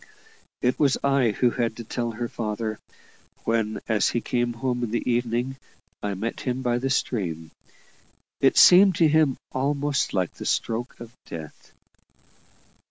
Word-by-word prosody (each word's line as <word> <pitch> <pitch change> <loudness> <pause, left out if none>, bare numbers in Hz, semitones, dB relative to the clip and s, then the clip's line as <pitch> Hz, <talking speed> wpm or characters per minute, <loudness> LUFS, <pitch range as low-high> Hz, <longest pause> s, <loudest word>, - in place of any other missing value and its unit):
It 125 - +1
was 140 -3 +3
I 135 -3 +3
who 120 +3 +2
had 115 -2 -2
to 120 - -6
tell 120 +1 -3
her 120 +1 -4
father, 110 -1 -4 0.6
when 110 -1 0
as 110 -3 +2
he 120 - 0
came 120 0 -1
home 125 +1 -2
in 120 - -2
the 115 +2 -2
evening 120 +2 0 0.4
I 100 -1 -2
met 115 +5 -4
him 130 0 -3
by 120 -1 +1
the 135 +2 -2
stream. 85 - -2 0.9
It - - +3
seemed 185 +1 +8
to 170 -2 +4
him 155 -3 +3
almost 140 +1 0
like 90 -3 -1
the - - -9
stroke 115 +2 -2
of 120 0 -10
death. 80 -2 -10
120 Hz, 155 wpm, -25 LUFS, 110-130 Hz, 0.9 s, seemed